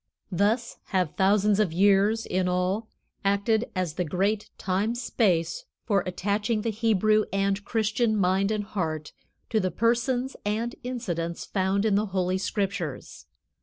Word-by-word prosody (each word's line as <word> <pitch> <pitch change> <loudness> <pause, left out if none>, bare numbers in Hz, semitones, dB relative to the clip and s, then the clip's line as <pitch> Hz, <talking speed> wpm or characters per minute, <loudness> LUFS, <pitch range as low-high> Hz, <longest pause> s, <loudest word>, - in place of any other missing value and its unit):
Thus 215 +6 +1
have 185 -5 0
thousands 200 +1 +3
of 210 -6 +2
years, 200 +5 +3
in 185 0 0
all, 185 +5 0 0.3
acted 200 +3 +1
as 180 -4 -1
the 180 - -1
great 195 +6 -1
time 200 +5 0
space 180 -9 0 0.2
for 200 -4 +2
attaching 205 +4 -1
the 230 - 0
Hebrew 215 -1 +2
and 195 +1 0
Christian 220 +1 +1
mind 190 +1 +2
and 215 -1 -1
heart 160 -7 -3 0.4
to 220 - +3
the 185 -2 0
persons 245 +4 0
and 225 +4 -1
incidents 175 -10 -3
found 195 +1 0
in 215 - +3
the 210 +2 +2
Holy 185 -1 0
Scriptures. 190 -7 -3
200 Hz, 140 wpm, -26 LUFS, 185-220 Hz, 0.4 s, thousands